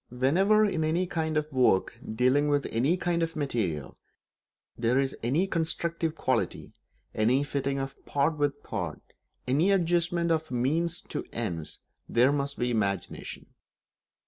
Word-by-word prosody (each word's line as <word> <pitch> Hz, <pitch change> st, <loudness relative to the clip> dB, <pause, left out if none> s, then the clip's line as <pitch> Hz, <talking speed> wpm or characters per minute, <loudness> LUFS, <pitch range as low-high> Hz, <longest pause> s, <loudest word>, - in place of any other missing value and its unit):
Whenever, 185 Hz, -, +3 dB
in 175 Hz, -6 st, 0 dB
any 165 Hz, +4 st, +1 dB
kind 160 Hz, -3 st, -1 dB
of 150 Hz, 0 st, -1 dB
work 115 Hz, -4 st, +2 dB, 0.2 s
dealing 130 Hz, +5 st, +3 dB
with 145 Hz, -1 st, +1 dB
any 135 Hz, +10 st, +2 dB
kind 175 Hz, -1 st, 0 dB
of 165 Hz, 0 st, -1 dB
material, 105 Hz, -, -2 dB, 0.8 s
there 120 Hz, +2 st, +1 dB
is 135 Hz, 0 st, +1 dB
any 140 Hz, +11 st, +1 dB
constructive 165 Hz, -2 st, -1 dB
quality, -, -, -1 dB, 0.4 s
any 120 Hz, +6 st, +2 dB
fitting 140 Hz, -1 st, -2 dB
of 135 Hz, 0 st, -4 dB
part 145 Hz, +3 st, +1 dB
with 145 Hz, -1 st, -1 dB
part, -, -, -4 dB, 0.5 s
any 150 Hz, +9 st, +3 dB
adjustment 170 Hz, -2 st, +2 dB
of 160 Hz, -1 st, 0 dB
means 150 Hz, +8 st, 0 dB
to -, -, -5 dB
ends, 80 Hz, -3 st, -4 dB, 0.3 s
there 125 Hz, +4 st, +4 dB
must 140 Hz, -1 st, -2 dB
be 125 Hz, 0 st, 0 dB
imagination. 100 Hz, -5 st, -3 dB
145 Hz, 140 wpm, -28 LUFS, 125-165 Hz, 0.8 s, there